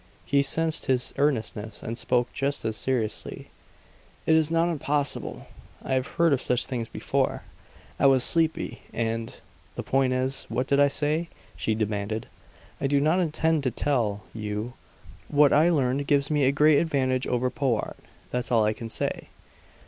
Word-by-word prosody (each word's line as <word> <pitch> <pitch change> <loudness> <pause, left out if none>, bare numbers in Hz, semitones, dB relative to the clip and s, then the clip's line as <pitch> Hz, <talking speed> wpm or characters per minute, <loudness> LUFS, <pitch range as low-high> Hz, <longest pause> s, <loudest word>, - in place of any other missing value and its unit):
She 140 0 +3
sensed 160 +3 0
his 125 -2 +1
earnestness, 110 -6 -1
and 115 - -4
spoke 125 0 0
just 140 -3 -1
as 110 -1 -1
seriously. 120 -3 -2 0.7
"It 160 - +4
is 160 -1 +4
not 165 +1 +2
impossible. 145 -3 -2 0.4
I - - -2
have 130 0 0
heard 170 -3 +4
of 135 - 0
such 125 -1 +1
things 120 -4 -4
before. - - -1 0.6
I - - +5
was 130 -2 +5
sleepy, 160 +1 +1
and 115 0 -3 0.4
the - - -4
point 135 -1 +1
is, 130 +1 -1
what 125 +3 -1
did 140 +1 +2
I 145 - +6
say?" 155 +4 -1 0.3
she 110 - -1
demanded. 105 0 -2 0.6
"I - - +3
do 140 0 +2
not 155 +6 +2
intend 160 -2 +1
to 135 - 0
tell 115 -7 -1
you. 105 +2 -4 0.5
What 145 -1 +4
I 155 +4 +5
learned 140 -3 +1
gives 145 0 +2
me 145 -2 +3
a 135 - +4
great 150 +1 +5
advantage 130 -5 0
over 125 +1 0
Powart; 130 -6 -1 0.3
that's 125 +1 -2
all 115 -3 +4
I 105 - +2
can 115 +1 -8
say. - - -3
135 Hz, 165 wpm, -26 LUFS, 115-145 Hz, 0.7 s, I